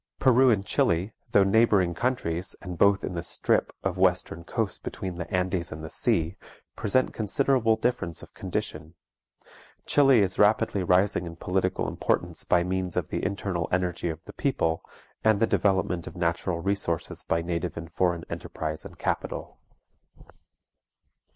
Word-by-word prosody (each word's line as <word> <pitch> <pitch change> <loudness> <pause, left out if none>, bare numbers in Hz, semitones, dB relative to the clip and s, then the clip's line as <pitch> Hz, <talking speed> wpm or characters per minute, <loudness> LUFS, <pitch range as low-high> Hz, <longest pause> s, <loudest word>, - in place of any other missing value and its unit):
Peru 130 0 +5
and 100 -4 +2
Chili, 90 +5 +1 0.2
though 100 - +6
neighboring 100 -3 +3
countries, 90 -5 -1
and 90 -2 -7
both 100 0 +4
in - - -3
the 85 - -3
strip - - 0
of - - -2
western 85 - +1
coast 105 +3 -2
between 95 -2 -5
the 85 - -5
Andes 90 -2 0
and 80 0 -7
the 80 - -7
sea, 85 +3 0 0.4
present 130 +5 +1
considerable 115 +1 +2
difference 110 -8 -2
of - - -14
condition. 80 +2 -4 0.9
Chili 135 -5 +5
is 95 -2 0
rapidly 105 -1 +3
rising 90 0 +2
in 85 - -8
political 95 +2 -1
importance - - -1
by 85 -1 +3
means 90 -1 -2
of - - -1
the - - -3
internal 95 -3 -2
energy 90 -1 0
of 80 0 -6
the - - -10
people, 80 -12 0 0.4
and 110 -2 +4
the 115 - +4
development 95 -5 +1
of - - -8
natural 85 0 -1
resources 95 -4 -1
by 85 0 0
native 85 -1 -3
and 80 -1 -7
foreign 85 -1 0
enterprise 80 0 -5
and - - -11
capital. - - -3
90 Hz, 150 wpm, -27 LUFS, 85-105 Hz, 0.9 s, though